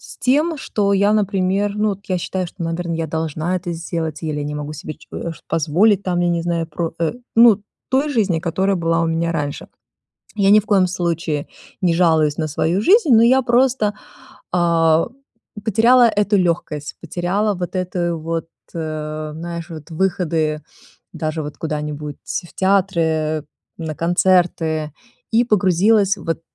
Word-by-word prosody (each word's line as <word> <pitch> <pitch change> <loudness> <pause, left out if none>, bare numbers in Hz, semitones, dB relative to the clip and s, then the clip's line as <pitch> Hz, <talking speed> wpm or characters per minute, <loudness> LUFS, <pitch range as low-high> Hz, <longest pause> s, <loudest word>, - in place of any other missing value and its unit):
с - - -12
тем, 300 +5 +1
что 205 -6 0
я, 200 +1 +3
например, 200 0 0
ну 215 +1 +1
вот 200 0 -7
я 185 -1 0
считаю, 185 +1 -3
что, 175 +1 -9
наверно, 165 +1 -2
я 165 0 -2
должна 160 +3 -2
это 175 -1 -4
сделать 165 -2 -4
или 155 -2 -2
я 145 - -3
не 150 0 -4
могу 150 0 -5
себе 155 +1 -7
че - - -20
э, 170 - -4
ш - - -16
позволить 175 +7 +2
там, 180 -1 0
я 175 - +2
не 170 -1 0
знаю, 170 -1 -1
про 160 +1 -4
э, 165 +5 0 0.2
ну, 225 -3 +6 0.3
той 270 +3 +2
жизни, 205 - +1
которая 190 +3 0
была 165 -1 +1
у - - +1
меня 165 +1 0
раньше. 145 -3 -4 0.7
Я 200 -1 +3
ни 210 +1 +7
в - - -16
коем 195 -3 +4
случае 170 -4 -2 0.4
не 175 -2 +3
жалуюсь 160 -4 +3
на 155 -1 -1
свою 165 +5 0
жизнь, 390 - +4
но 225 - +6
я 260 +3 +5
просто, 240 -3 +2 0.6
а, 165 -2 +3 0.6
потеряла 235 +4 +5
эту 205 -1 +1
лёгкость, 165 -5 -1
потеряла 180 +5 -1
вот 180 +1 -5
эту 175 -2 -1
вот, 165 +1 -3 0.3
э, 155 -1 -4
знаешь, 170 0 -6
вот 160 -1 -9
выходы 160 -3 0 0.5
даже 155 -1 -3
вот 145 0 -8
куда-нибудь 150 -2 -4
в 175 -1 -5
театры, 195 -2 +2
э, 155 -1 0 0.3
на 160 -2 -5
концерты. 165 -3 +1 0.4
И 230 +2 +4
погрузилась 205 0 +3
вот 165 -2 -3
175 Hz, 165 wpm, -20 LUFS, 160-200 Hz, 0.7 s, ни